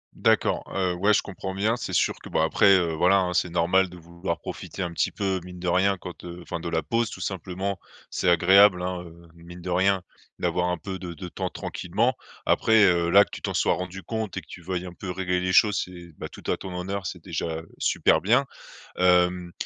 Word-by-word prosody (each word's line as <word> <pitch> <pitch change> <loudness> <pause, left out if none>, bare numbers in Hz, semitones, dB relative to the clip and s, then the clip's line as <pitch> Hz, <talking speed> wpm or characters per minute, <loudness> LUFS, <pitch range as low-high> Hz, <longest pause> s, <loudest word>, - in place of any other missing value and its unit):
D'accord, - - +2
heu, 95 -2 +1
ouais 100 +4 +2
je 105 - +3
comprends 95 -1 -6
bien, 105 +4 +1
c'est - - -5
sûr - - +2
que, - - -9
bah, 80 - +1
après, 100 +5 +5
heu, 85 -3 0
voilà 90 +5 +4
hein, 90 -2 0
c'est 90 0 +1
normal 90 +3 +2
de 90 - -12
vouloir 85 0 -5
profiter 95 - -6
un 85 -1 -4
petit - - +1
peu, 95 -2 -1
mine 90 0 -10
de 90 - -4
rien, 95 +2 +3
quand, 90 -1 -10
heu 85 0 -8
enfin, 85 - -5
de 85 - -4
la 80 -1 -1
pause 115 -1 0
tout - - -9
simplement. 95 +1 -3 0.3
C'est 90 - +1
agréable 90 +2 +6
hein, 90 -1 -3
heu, 85 0 -14
mine 85 +1 -12
de 90 - -5
rien, 95 +1 +2 0.3
d'avoir 90 +1 0
un 90 - -1
peu 95 +3 -6
de 85 -1 -6
de 90 +2 -7
temps - - -3
tranquillement. 110 +9 -1 0.3
Après, 110 -1 +4
heu, 85 -2 +3
là, 100 +3 +7
que - - -25
tu - - -8
t'en - - -3
sois - - +3
rendu 90 +1 -5
compte 110 +1 -4
et - - -2
que - - -22
tu 90 - -10
veuilles 90 +1 -3
un 90 - -8
peu 95 +1 -8
régler 90 0 -1
les 90 0 -1
choses, 105 +1 +5
c'est, 85 -1 -11
ben, - - -6
tout - - -13
à - - 0
ton 95 -2 -7
honneur, 95 +1 -3
c'est 90 -2 -7
déjà, 85 -2 -3
heu, 80 - -16
super - - +3
bien, - - +3 0.5
hem 90 -1 +3
90 Hz, 235 wpm, -25 LUFS, 85-95 Hz, 0.5 s, là